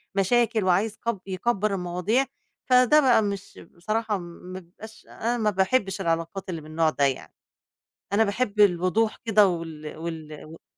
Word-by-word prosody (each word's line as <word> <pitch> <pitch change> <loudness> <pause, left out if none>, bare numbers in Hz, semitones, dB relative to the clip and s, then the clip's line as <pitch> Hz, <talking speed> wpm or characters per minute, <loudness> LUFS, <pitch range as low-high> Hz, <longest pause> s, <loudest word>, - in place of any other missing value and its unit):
مشاكل 225 +2 +2
وعايز 195 +4 +1
كب 230 -4 -3
يكبّر 200 +2 -1
المواضيع 180 +7 0 0.4
فده 255 +4 +6
بقى 250 -5 +4
مش 200 -1 -5
بصراحة 215 +4 -2
ما 175 0 -10
بابقاش 195 +5 -14
أنا 235 +2 -2
ما 215 -2 +1
باحبّش 195 0 0
العلاقات 165 +2 -2
اللي 165 -3 -4
من 155 - -13
النوع 160 0 +2
ده، 145 -2 +1
يعني 135 -2 -3 0.8
أنا 215 +2 +4
باحب 210 0 -1
الوضوح 200 +3 +3
كده 210 -2 +5
وال 160 -3 -5
وال 160 -1 -6
إمم. 155 +2 -11
195 Hz, 150 wpm, -25 LUFS, 170-220 Hz, 0.8 s, فده